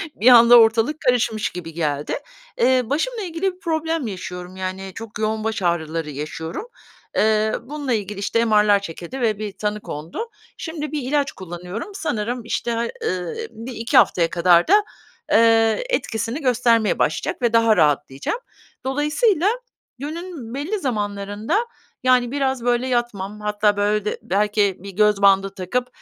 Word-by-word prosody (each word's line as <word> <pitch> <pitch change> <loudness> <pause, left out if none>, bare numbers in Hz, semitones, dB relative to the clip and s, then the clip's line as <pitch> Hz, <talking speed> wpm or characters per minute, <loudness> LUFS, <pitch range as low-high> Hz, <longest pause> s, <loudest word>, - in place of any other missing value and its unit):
bir 225 - 0
anda 240 -1 +9
ortalık 225 +7 +3
karışmış 240 -5 +1
gibi 165 -2 -8
geldi. 150 -3 -2 0.5
Eee, 260 - +4
başımla 425 - -1
ilgili 360 +1 -2
bir 365 - -23
problem 320 - -1
yaşıyorum, 180 -2 -7
yani, 190 +1 -5
çok 225 -2 -8
yoğun 215 0 -1
baş 220 -2 -2
ağrıları 165 -3 -1
yaşıyorum. 160 - -6 0.5
Eee, 215 0 +2
bununla 285 -1 -3
ilgili, 205 -2 -3
işte, 230 +3 +1
MR'lar 210 -2 +4
çekildi 195 +7 -7
ve 215 -3 +1
bir 210 -2 -4
tanı 210 +1 -3
kondu. 165 - -6 0.3
Şimdi 310 -3 -5
bir 300 -2 -2
ilaç 280 +2 0
kullanıyorum. 180 - -7
Sanırım, 240 - -3
işte, 235 +1 -2 0.3
ııı, 185 - -2 0.2
1-2 230 0 -2
haftaya 170 -2 +4
kadar 175 -1 +4
da, 415 +3 +5 0.5
eee, 225 - +4
etkisini 235 - -2
göstermeye 235 -4 +2
başlayacak - - -1
ve 240 -2 +1
daha 230 -1 +4
rahatlayacağım. 145 - +1 0.5
Dolayısıyla 300 - +1 0.5
günün 310 -5 -6
belli 320 +10 -2
zamanlarında, 210 - -2 0.4
yani, 250 -1 +3
biraz, 265 -3 -1
böyle, 245 +1 +1
yatmam, 210 -5 -2
hatta 210 0 +1
böyle 210 0 +1
de 210 - -2
belki 205 0 +1
bir 200 +2 -9
göz 210 +1 +2
bandı 195 0 +5
takıp, 245 +7 -2
225 Hz, 145 wpm, -21 LUFS, 200-260 Hz, 0.5 s, anda